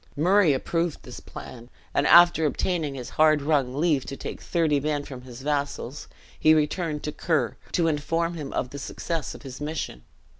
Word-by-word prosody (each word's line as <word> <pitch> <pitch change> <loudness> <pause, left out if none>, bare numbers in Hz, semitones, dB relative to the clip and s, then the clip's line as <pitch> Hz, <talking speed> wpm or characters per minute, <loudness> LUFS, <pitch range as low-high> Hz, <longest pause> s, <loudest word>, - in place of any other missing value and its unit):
Murray 180 +2 +4
approved 165 +4 -1
this - - -9
plan; 120 -1 -10 0.2
and 140 - +2
after 170 -2 +7
obtaining 155 -2 -1
his 125 -2 -7
hard 155 -1 +6
wrung 140 -4 +1
leave 150 -3 +2
to 135 - -6
take - - -6
thirty 160 -4 +1
men 145 0 -1
from 130 -3 -9
his 125 0 -11
vassals, 145 -2 -2 0.3
he 155 0 +6
returned 155 0 -1
to 150 - -2
Ker, 145 - 0 0.2
to 170 -2 +2
inform 165 +3 0
him 150 -5 -6
of 125 - -2
the 140 - -6
success 165 +2 -4
of - - -12
his 130 0 -9
mission. 150 - -4
150 Hz, 180 wpm, -26 LUFS, 135-165 Hz, 0.3 s, after